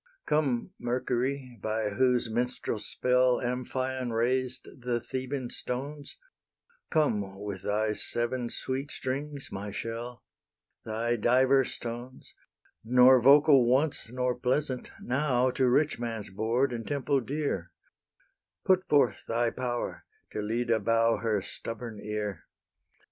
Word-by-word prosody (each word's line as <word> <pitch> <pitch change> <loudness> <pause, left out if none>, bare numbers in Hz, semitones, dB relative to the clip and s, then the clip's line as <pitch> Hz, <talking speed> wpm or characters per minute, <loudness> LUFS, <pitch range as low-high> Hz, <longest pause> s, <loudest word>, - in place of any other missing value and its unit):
Come, 140 -6 0
Mercury, 125 +1 -2
by 110 0 -1
whose 125 +2 +3
minstrel 120 -1 -2
spell 125 +3 +2
Amphion 130 0 -2
raised 125 +3 0
the 120 -1 0
Theban 130 +1 -4
stones, 140 +4 -5 0.7
Come, 105 - 0
with 100 -2 -5
thy 105 +1 0
seven 120 +2 -1
sweet 135 +4 -3
strings, 140 +1 -4
my 100 +2 -5
shell, 115 +4 -5 0.6
Thy 115 +2 -1
"diverse 130 +4 +3
tones," 120 +2 -7 0.5
Nor 125 +2 +6
vocal 140 -1 +7
once 130 -1 +1
nor 125 0 0
pleasant, 130 +1 -1
now 130 -1 +1
To 130 0 +2
rich 145 +2 +2
man's 115 -4 -4
board 115 +6 +1
and 115 -1 -5
temple 140 -1 +1
dear: 130 - -3 0.9
Put 185 0 +3
forth 125 -9 +3
thy 115 0 +1
power, 120 -2 -3 0.3
till 105 0 -3
Lyde 115 -2 +1
bow 115 +1 +3
Her 110 -4 0
stubborn 115 +1 -7
ear. 105 -3 -4
125 Hz, 115 wpm, -29 LUFS, 115-130 Hz, 0.9 s, vocal